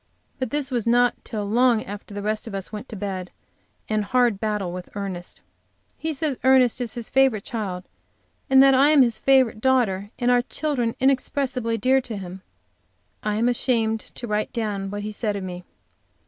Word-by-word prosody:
But 260 - -2
this 290 -2 -2
was 235 -3 -1
not 245 +1 +4
till 210 -3 -4
long 235 +1 +3
after 205 +1 -9
the 205 - -4
rest 215 +2 -2
of 210 - -6
us 195 -1 -5
went 210 +4 -7
to 225 - -7
bed, 190 -2 -4 0.6
and 215 -1 0
a - - -4
hard 245 -4 +2
battle 210 -4 -2
with 180 0 -7
Ernest. 190 -3 -6 0.5
He 320 - -3
says 290 -2 -2
Ernest 260 -2 +4
is 240 - -2
his 235 -2 -3
favorite 265 -6 +2
child, 195 -6 -4 0.7
and 265 0 +7
that 270 0 +6
I 275 +3 +5
am 300 -3 +6
his 235 -3 -1
favorite 260 -5 +3
daughter, 220 -7 +1
and 245 0 +2
our 245 0 +4
children 250 -3 -2
inexpressibly 260 -3 0
dear 260 +5 +3
to 230 -4 -4
him. 185 -1 -8 0.8
I 210 -1 -1
am 225 +3 +1
ashamed 230 -3 +1
to 240 - -9
write 210 -1 -1
down 205 -4 -3
what 205 +1 -5
he 215 - -4
said 210 -1 -2
of 200 - -4
me. 180 -1 -7
225 Hz, 190 wpm, -23 LUFS, 205-255 Hz, 0.8 s, and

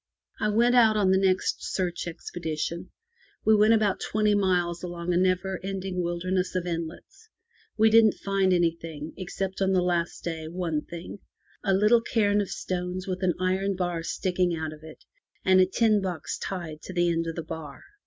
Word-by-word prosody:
I 210 - +1
went 235 +3 +3
out 225 -3 +5
on 195 -3 +3
the 190 - +4
next 190 -1 +1 0.2
search 175 -2 -2
expedition. 170 0 -4 0.6
We 220 - +6
went 215 +2 +5
about 210 -3 +1
twenty 210 0 +1
miles 180 -4 +1
along 175 0 -3
a - - +2
never 185 +1 +1
ending 190 -1 -3
wilderness 180 +2 -1
of 180 -1 -1
inlets. 175 - -6 0.5
We 220 0 +5
didn't 220 -2 +6
find 195 -1 +1
anything, 165 -3 -1
except 190 +1 -4
on 190 0 +2
the 185 -1 +3
last 175 -2 -1
day 160 -2 -4
one 165 -2 -2
thing— 170 +4 -8 0.4
a 195 -2 +2
little 210 +4 +4
cairn 210 -3 +2
of 200 - -4
stones 180 0 -4
with 185 0 -4
an 180 -3 +1
iron 190 +2 0
bar 175 -2 -2
sticking 180 0 0
out 160 -1 -4
of 155 - -13
it, 155 0 -13 0.4
and 185 0 +6
a 185 - +4
tin 215 +1 +2
box 175 -5 -4
tied 170 -5 -5
to 185 - -8
the 175 -1 +2
end 165 0 -1
of 165 - -4
the 165 - -4
bar. 155 -3 -8
185 Hz, 185 wpm, -27 LUFS, 170-195 Hz, 0.6 s, We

